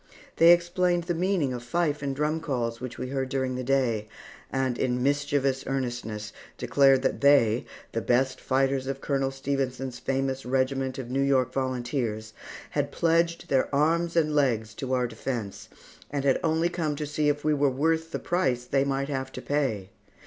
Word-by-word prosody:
They 165 +1 +8
explained 175 0 +2
the 175 - -1
meaning 170 -6 0
of 120 - -5
fife 150 +4 -1
and 140 -1 -2
drum 150 +3 0
calls 120 -7 -2
which 125 -1 -6
we 130 - -4
heard 135 -1 -2
during 130 -1 -1
the 130 0 -3
day, 120 -5 +1 0.4
and 130 -2 0
in 125 -1 0
mischievous 140 -1 +1
earnestness, 120 -6 -3 0.2
declared 135 -2 +4
that - - 0
they, 125 -5 +4 0.3
the 115 - -2
best 130 +5 +1
fighters 135 0 +1
of 135 0 -3
Colonel 135 -1 0
Stephenson's 135 -2 -3
famous 135 0 -1
regiment 130 +1 0
of 125 -2 -6
New 135 +1 +1
York 130 -2 +2
Volunteers, 120 -4 -2 0.4
had - - -1
pledged 170 0 +1
their 135 -1 +2
arms 165 +3 +2
and 155 -2 +2
legs 115 -7 +1
to 130 +3 -5
our 125 -1 +2
defence, 115 -3 -5 0.4
and 140 -1 -2
had 135 - +3
only 165 +1 +2
come 165 -4 -2
to 150 +1 -3
see 150 0 0
if 145 0 -1
we 155 - +2
were 145 -1 +3
worth 160 +5 0
the - - -3
price 130 -9 0
they 135 +2 +2
might 140 0 -1
have 130 -2 -3
to, - - -6
pay. 120 -10 -1
135 Hz, 180 wpm, -27 LUFS, 125-150 Hz, 0.4 s, They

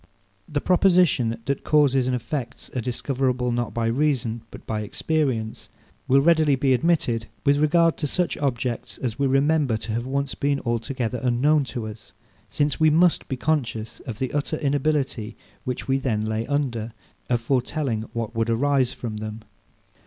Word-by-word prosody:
This 145 -1 -2
proposition, 175 -11 +3
that 140 0 -2
causes 135 -4 +3
and 130 - +1
effects 125 +1 -5
are 125 - 0
discoverable, 125 +1 -1
not 120 -3 -1
by 115 +2 -1
reason 120 -2 0
but - - -12
by 110 -1 -2
experience, 120 -1 -2 0.4
will 135 +1 +5
readily 155 -2 +4
be 135 0 +2
admitted 125 -6 +1 0.2
with 140 0 +4
regard 165 +2 +3
to 150 - -1
such 180 +4 0
objects, 125 -4 -2
as 120 -2 -4
we 140 - +3
remember 135 -2 +2
to 110 +1 -6
have 120 +3 -2
once 140 +1 -1
been 140 0 0
altogether 120 +1 -2
unknown 135 +4 +3
to 120 -3 -5
us; 110 -1 -10 0.4
since 145 +1 0
we 155 0 +5
must 165 +3 +3
be 130 - -3
conscious 125 -7 -1
of 115 -4 -5
the 130 +1 -3
utter 145 +2 -1
inability, 140 -6 -1 0.3
which 125 -1 -3
we 135 0 +2
then 115 -6 0
lay 110 +1 -2
under, 120 -6 -1 0.4
of 120 -1 +2
foretelling 125 -1 0
what 115 -1 -4
would 115 0 0
arise 130 +1 +2
from 110 -4 -5
them. 110 +1 -6
130 Hz, 165 wpm, -24 LUFS, 115-145 Hz, 0.4 s, will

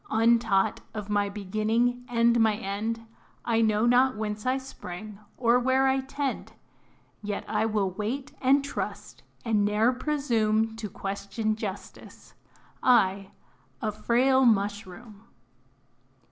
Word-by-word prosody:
Untaught 225 -3 +2 0.2
of 210 -1 -5
my 205 -1 +1
beginning 215 +5 -1
and 235 0 +3
my 220 -2 +3
end, 220 +2 -4 0.4
I 230 -1 +2
know 215 0 +2
not 250 0 +4
whence 210 +1 -4
I 260 +1 +2
sprang, 210 -5 -9 0.2
or 240 0 +3
where 260 +2 +2
I 265 0 +2
tend; 270 +1 -4 0.7
Yet, 205 -1 -4
I 220 - 0
will 205 -3 0
wait 255 +9 -4
and 275 +2 +4
trust, 280 - -6 0.2
and 215 -3 +2
ne'er 210 +4 +2
presume 225 -6 0
To 220 -2 -5
question 200 +3 -3
JUSTICE 205 -3 -8 0.5
I, 195 -6 +3 0.5
a 215 - -2
frail 255 +5 +2
Mushroom! 205 0 -1
220 Hz, 120 wpm, -27 LUFS, 205-245 Hz, 0.7 s, not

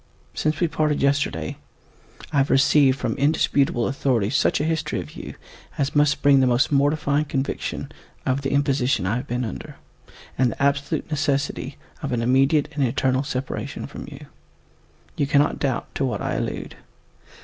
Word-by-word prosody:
Since 155 0 -1
we 175 - +3
parted 155 -2 0
yesterday, 140 - 0 0.8
I - - +1
have 135 0 +3
received 135 -1 +4
from - - -1
indisputable 140 -3 +2
authority 125 -6 0
such 135 - +2
a - - 0
history 160 -1 -1
of - - -7
you - - -8 0.4
as 140 +1 -1
must 145 -1 +3
bring 140 -1 +6
the 130 - +4
most 125 +3 +2
mortifying 145 +1 +2
conviction 135 -1 -3 0.3
of 130 +2 0
the 135 - -2
imposition 135 -6 +1
I 100 +6 0
have 130 +3 -5
been 125 0 -2
under, 110 - -7 0.6
and 130 -2 +4
the - - -4
absolute 140 +2 0
necessity 140 -2 -1 0.2
of 140 -4 -3
an 120 -2 0
immediate 135 +4 +3
and 145 -1 0
eternal 130 +1 +1
separation 130 -1 -4
from - - -9
you. - - -10 0.9
You 140 - +1
cannot 145 +1 +2
doubt 135 -4 -2
to - - -2
what 125 - -2
I - - -2
allude. - - -4
140 Hz, 165 wpm, -23 LUFS, 130-145 Hz, 0.9 s, bring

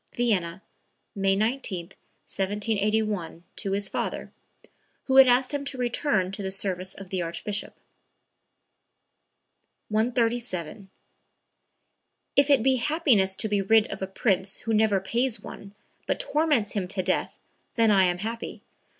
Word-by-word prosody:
(Vienna, 190 -7 0 0.5
May 195 -1 +1
19, 210 -5 -2 0.4
1781, 205 -3 -1
to 195 - -3
his 200 0 0
father, - - -4 0.7
who 265 0 +1
had 270 -1 +10
asked 250 +2 +3
him 285 -1 -2
to 280 - -2
return 240 -5 0
to 195 - -5
the 190 - -3
service 190 -1 -2
of 195 -2 -11
the 185 -2 -1
Archbishop.) 200 +5 -3 2.1
137. 225 -5 -1 1.5
"If 280 +1 +4
it 275 -6 +5
be 265 0 +3
happiness 240 - +2
to 220 - -1
be 205 -1 +1
rid 220 +2 +4
of - - -6
a 190 - -2
prince 190 -1 0
who 225 - -2
never 215 -2 +3
pays 235 +5 -1
one, 200 0 -11 0.3
but - - 0
torments 300 - +1
him 195 -4 -2
to 185 0 -2
death, - - -1 0.4
then 225 -2 +4
I 190 -2 +5
am 175 -1 +1
happy. 225 +4 -6
210 Hz, 135 wpm, -26 LUFS, 190-240 Hz, 2.1 s, had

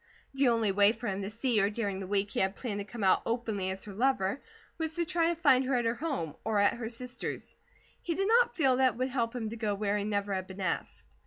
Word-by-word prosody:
The 270 0 +2
only 230 -4 +3
way 205 +2 +5
for 240 - -9
him 195 -1 -2
to 195 - -3
see 230 +1 0
her 200 0 +3
during 205 -3 -2
the 190 - -5
week 200 +1 0
he - - -2
had 190 +1 +1
planned 210 -5 -4
to - - -3
come 215 +1 -7
out 190 - +4
openly 220 -5 -2
as 190 0 -4
her 205 - -9
lover, 250 0 +1 0.4
was 320 -1 -1
to 345 -1 0
try 335 -1 +1
to 340 - +1
find 275 -6 +4
her 260 0 +1
at 240 -1 +1
her 230 - +2
home, 255 - -3
or 220 -1 0
at 205 0 +4
her 230 -2 -5
sister's. 250 +1 -6 0.5
He 335 - -2
did 390 +3 0
not 475 +2 +4
feel 265 -7 +3
that 260 -2 +4
it - - -13
would 255 +1 0
help 235 -2 -1
him 225 -3 -3
to 230 - -6
go 215 -2 -1
where 205 0 0
he - - -2
never 205 -1 -1
had 185 -1 -3
been 190 +1 -10
asked. 185 - -3
230 Hz, 270 wpm, -30 LUFS, 200-260 Hz, 0.5 s, way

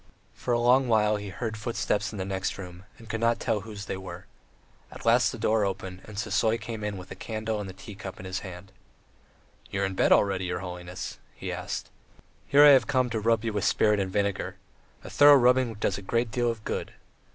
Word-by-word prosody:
For 125 - -4
a 120 - +3
long 125 +2 +4
while 105 -2 +3
he 100 -1 -6
heard 110 +3 -4
footsteps 105 -2 -1
in 105 - -7
the 95 - -3
next 95 -1 -2
room 90 -1 -9
and 115 - -14
could 110 +1 -3
not 115 +1 +2
tell 115 -3 0
whose 105 -1 -8
they 95 - -4
were. 90 -2 -9 0.7
At - - -11
last - - +4
the - - -7
door 110 -1 +2
opened, 95 -1 -4
and 105 -2 -10
Sisoy 110 +2 +1
came 110 0 -6
in 105 -1 -3
with 90 - -10
a - - -6
candle 110 -1 -3
and 100 - -6
a - - -8
tea 95 +3 -10
cup 95 -1 -8
in 95 - -9
his 95 0 -3
hand. 95 0 -10 1.0
"You 100 0 -1
are - - +3
in 95 - -3
bed 95 - +2
already, 95 -2 +3
your 90 0 -3
holiness?" 90 0 -7 0.2
he - - -5
asked. - - -5 0.6
"Here 145 +1 +7
I - - +10
have 130 -6 +6
come 130 -2 +1
to 110 - -1
rub 115 +1 +1
you 110 - -1
with 105 -2 -1
spirit 105 -1 +3
and 95 -1 -1
vinegar. 100 -1 -1 0.5
A - - -8
thorough 145 0 +8
rubbing 125 -2 +3
does 100 -2 -1
a - - -9
great 115 +4 -1
deal 120 -1 +1
of 115 -2 -4
good. - - -3
105 Hz, 230 wpm, -27 LUFS, 95-115 Hz, 1.0 s, I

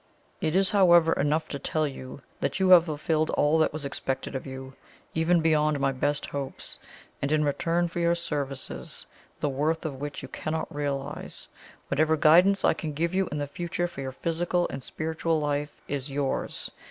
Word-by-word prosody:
It 155 - 0
is, 195 0 +4
however, 175 -5 +6
enough 150 +3 +1
to 140 - -4
tell 155 +2 0
you 135 0 -8 0.2
that - - -1
you 190 -1 +3
have 175 -2 +9
fulfilled 155 0 0
all 150 +2 +3
that 155 - +3
was 150 -1 -5
expected 135 -1 -3
of 130 0 -4
you, 130 0 -7 0.4
even 165 +1 +3
beyond 155 -2 +2
my 135 0 +2
best 145 +2 0
hopes; 140 -1 -5 0.4
and 140 - -1
in 155 -1 +3
return 170 +4 +1
for 170 +1 -5
your 170 0 +3
services, 145 -6 -4 0.4
the 145 - +1
worth 155 +5 0
of 140 -3 -4
which 145 0 -5
you - - -6
cannot 160 +1 -4
realize, 140 -2 -4 0.4
whatever 155 +3 +2
guidance 180 +6 +5
I - - +5
can 155 -1 -5
give 165 +4 -1
you 190 -1 +1
in 150 - -2
the 145 - -1
future 175 +4 -2
for 170 -6 -8
your 130 -1 -4
physical 175 +5 0
and 135 - -5
spiritual 160 +2 -1
life, 145 0 -2
is 140 0 -3
yours. 140 -1 -2
155 Hz, 185 wpm, -27 LUFS, 140-170 Hz, 0.4 s, have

